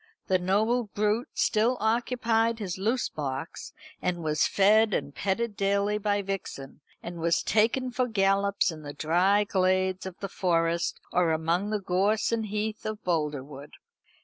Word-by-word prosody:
The 185 -1 +2
noble 215 +7 +1
brute 210 +3 -1
still 230 +4 +2
occupied 230 0 +1
his 190 -4 -5
loose 230 +6 0
box, 140 0 -5 0.3
and 175 -2 -2
was 155 -1 +2
fed 215 +2 +4
and 140 - -3
petted 205 +5 -2
daily 200 +1 +1
by 205 -1 0
Vixen, 185 -8 -6 0.2
and 170 0 -7
was 170 0 +1
taken 235 +4 +1
for 250 0 0
gallops 200 -3 +2
in 155 -1 -9
the 145 -1 -7
dry 180 +7 +2
glades 185 -1 0
of 185 - -9
the 195 - -4
Forest, 170 -3 0
or 175 -2 +3
among 165 +5 0
the 215 -1 -1
gorse 200 +4 +1
and 225 -2 -1
heath 215 +1 -3
of 215 -1 -5
Boldrewood. 150 -4 -3
195 Hz, 150 wpm, -27 LUFS, 170-215 Hz, 0.3 s, fed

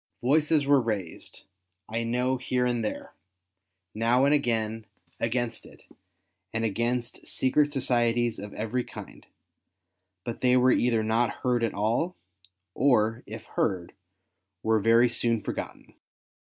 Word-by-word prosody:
Voices 150 +2 +3
were 140 -1 +5
raised, 105 -8 -5 0.4
I 115 +1 -2
know 125 +3 0
here 125 0 0
and 120 -2 0
there, 105 - -5 0.8
now 120 +4 +3
and 140 - +4
again, 115 -5 0 0.3
against 120 0 -1
it, - - -16 0.7
and 115 0 -1
against 120 +3 -2
Secret 145 +3 +1
Societies 120 -3 +1
of 100 +1 -7
every 115 +3 -2
kind; - - -11 1.0
but 120 - -5
they 125 0 +4
were 125 +1 +5
either 115 -3 +2
not 115 +2 +2
heard 125 -2 +1
at 115 - -1
all, 115 - 0 0.6
or, 115 -3 +2
if 110 +1 -8
heard, 90 -5 -2 0.7
were 110 0 +3
very 115 +3 +5
soon 115 -1 0
forgotten. - - -6
120 Hz, 125 wpm, -27 LUFS, 110-125 Hz, 1.0 s, were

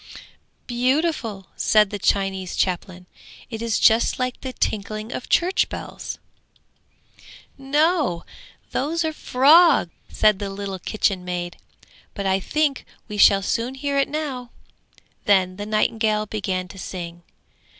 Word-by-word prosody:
'Beautiful!' 250 - 0
said 210 -2 +3
the 205 - -4
Chinese 195 -2 0
chaplain, 180 0 -2 0.5
'it 225 -1 -5
is 230 -1 0
just 225 +1 +4
like 255 -1 -3
the 260 - -5
tinkling 215 -1 -3
of 255 - -6
church 360 +2 +2
bells.' - - -6 1.4
'No, 285 - +1 0.5
those 320 +5 -1
are 315 - 0
the 310 - -17
frogs!' 285 - +5 0.2
said 215 -2 +3
the 200 -1 -3
little 195 -1 -5
kitchen 195 -1 -1
maid. 175 -1 -4 0.6
'But 200 - -4
I 190 0 +2
think 290 +6 0 0.2
we 210 -2 -6
shall 195 -1 +6
soon 235 +6 -1
hear 280 +1 -1
it 275 - +1
now!' 280 -5 -4 0.8
Then 185 -2 +3
the 205 0 -5
nightingale 215 0 +1
began 190 -3 -3
to 195 - -11
sing. 175 -2 -7
215 Hz, 130 wpm, -23 LUFS, 195-270 Hz, 1.4 s, shall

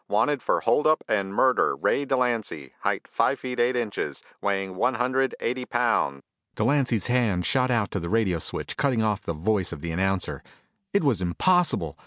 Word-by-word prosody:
Wanted 145 -3 +1
for - - +1
hold 150 - +2
up 155 0 +3
and 100 -2 0
murder, 130 +5 +3
Ray 140 - 0
Delancy, 120 - -1
height - - -1
five 135 - +1
feet 125 -1 -5
eight 120 +2 +2
inches, 115 -4 -3 0.2
weighing 95 -2 -1
one 125 +7 +1
hundred 130 +2 0
eighty 125 +2 -2
pounds 115 - 0 0.2
" - - -50
Delancy's 125 -2 +1
hand 115 -8 +1
shot 130 +8 +2
out 115 -5 +1
to 100 - -2
the 85 -1 -5
radio 100 -6 +1
switch, - - -5
cutting 125 -5 +1
off 105 -2 0
the 85 - -4
voice 95 +4 0
of 70 - -7
the 85 - -4
announcer. 95 +2 -1 0.5
It 200 - +2
was 125 -10 +2
impossible! 90 - +1
115 Hz, 185 wpm, -25 LUFS, 95-130 Hz, 0.5 s, up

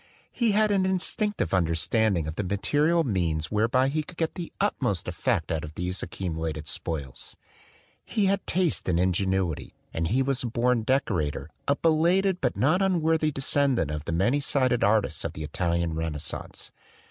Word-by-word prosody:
He 235 -4 +1
had 215 0 +3
an 195 -2 +2
instinctive 190 - +1
under 85 -3 +2
standing 100 -1 +1
of 80 - -3
the 105 - -3
material 150 - +1
means 85 - -1
whereby 115 +5 +2
he 155 +2 -1
could 165 +3 -12
get 160 -1 -1
the 175 -3 -6
utmost - - 0
effect - - -1
out 80 -2 -1
of 75 +1 -8
these 90 +1 -3
accu 90 -4 -4
mulated 80 -1 -4
spoils. 70 -4 -3 0.7
He 210 - 0
had 195 0 +1
taste 175 - +1
and 85 -1 +2
ingenuity; 95 -2 0 0.2
and 80 0 -1
he 130 +9 +2
was 135 -1 0
a 125 - 0
born 120 +1 +1
decorator, 85 - -1 0.2
a 140 - +3
belated 175 +5 +2
but 125 - 0
not 155 +9 +3
unworthy 160 -4 +2
descendant 135 - +1
of 75 -1 -5
the - - -3
many 100 - +2
sided 130 -4 +1
artists 105 +1 +2
of - - -3
the 80 - -6
Italian 85 +1 -1
Renascence. 80 -2 -5
115 Hz, 170 wpm, -26 LUFS, -, 0.7 s, had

